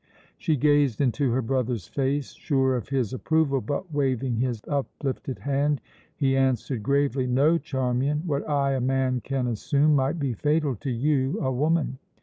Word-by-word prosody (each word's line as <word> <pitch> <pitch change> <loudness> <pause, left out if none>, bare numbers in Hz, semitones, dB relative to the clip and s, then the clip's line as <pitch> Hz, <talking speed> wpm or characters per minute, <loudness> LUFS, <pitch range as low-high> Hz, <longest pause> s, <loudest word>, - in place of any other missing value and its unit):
She 160 -5 0
gazed 145 -3 +3
into 130 -1 +1
her 130 +2 0
brother's 120 -5 -1
face, 140 +1 -1
sure 135 -4 +1
of 120 -1 -4
his 130 -6 -1
approval 140 -1 +1
but, 145 - -4
waving 130 -4 0
his 120 -2 -1
uplifted 135 -2 -3
hand, 145 +1 0 0.4
he 135 -2 +1
answered 130 -2 0
gravely: 140 0 +1
"No, 145 +7 +3
Charmian! 130 +3 -1
What 145 -2 -2
I, 140 -2 +2
a 130 - -1
man, 130 -1 +1
can 135 -2 -1
assume, 140 +6 +2
might 135 +4 +1
be 140 -5 -1
fatal 150 +3 +1
to 135 - -5
you, 130 +2 0
a 130 - 0
woman. 145 0 0
135 Hz, 160 wpm, -26 LUFS, 130-145 Hz, 0.4 s, gazed